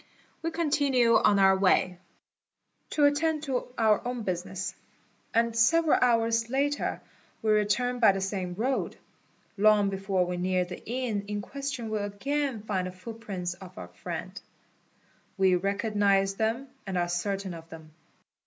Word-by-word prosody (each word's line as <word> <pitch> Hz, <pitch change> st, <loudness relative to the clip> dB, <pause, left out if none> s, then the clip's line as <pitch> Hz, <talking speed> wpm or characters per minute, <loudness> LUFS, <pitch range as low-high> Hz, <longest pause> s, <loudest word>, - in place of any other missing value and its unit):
We 330 Hz, -, -1 dB
continue 285 Hz, -7 st, +2 dB
on 205 Hz, -, +4 dB
our 190 Hz, -1 st, +5 dB
way, 185 Hz, -1 st, +2 dB, 0.9 s
to 295 Hz, -, +3 dB
attend 305 Hz, +1 st, +1 dB
to 265 Hz, -4 st, -2 dB
our 220 Hz, -2 st, +3 dB
own 245 Hz, -1 st, -3 dB
business, 185 Hz, 0 st, -3 dB, 0.6 s
and 230 Hz, 0 st, +1 dB
several 315 Hz, +7 st, +4 dB
"hours 230 Hz, -1 st, +2 dB
later 285 Hz, +3 st, -1 dB, 0.4 s
we 215 Hz, -, +2 dB
return 215 Hz, +4 st, +1 dB
by 220 Hz, -4 st, +7 dB
the 195 Hz, -, -3 dB
same 190 Hz, -2 st, -3 dB
road. 255 Hz, +7 st, -1 dB, 0.6 s
Long 210 Hz, -1 st, +4 dB
before 195 Hz, -1 st, 0 dB
we 180 Hz, 0 st, -3 dB
near 180 Hz, 0 st, 0 dB
the 180 Hz, -, -9 dB
inn 235 Hz, -5 st, -2 dB
in 205 Hz, 0 st, -3 dB
question 265 Hz, -1 st, -5 dB
we 215 Hz, -, 0 dB
again 235 Hz, +4 st, -2 dB
find 190 Hz, -4 st, -2 dB
the -, -, -6 dB
footprints 185 Hz, -2 st, -6 dB
of 180 Hz, 0 st, -13 dB
our 90 Hz, -1 st, -8 dB
friend; 90 Hz, -, -7 dB, 1.0 s
we 190 Hz, -1 st, +4 dB
recognise 200 Hz, +1 st, +1 dB
them 225 Hz, +6 st, -1 dB, 0.2 s
and 190 Hz, -1 st, -2 dB
are 175 Hz, 0 st, +1 dB
certain 190 Hz, +2 st, -2 dB
of 165 Hz, -1 st, -11 dB
them. 160 Hz, -1 st, -12 dB
210 Hz, 145 wpm, -28 LUFS, 190-245 Hz, 1.0 s, by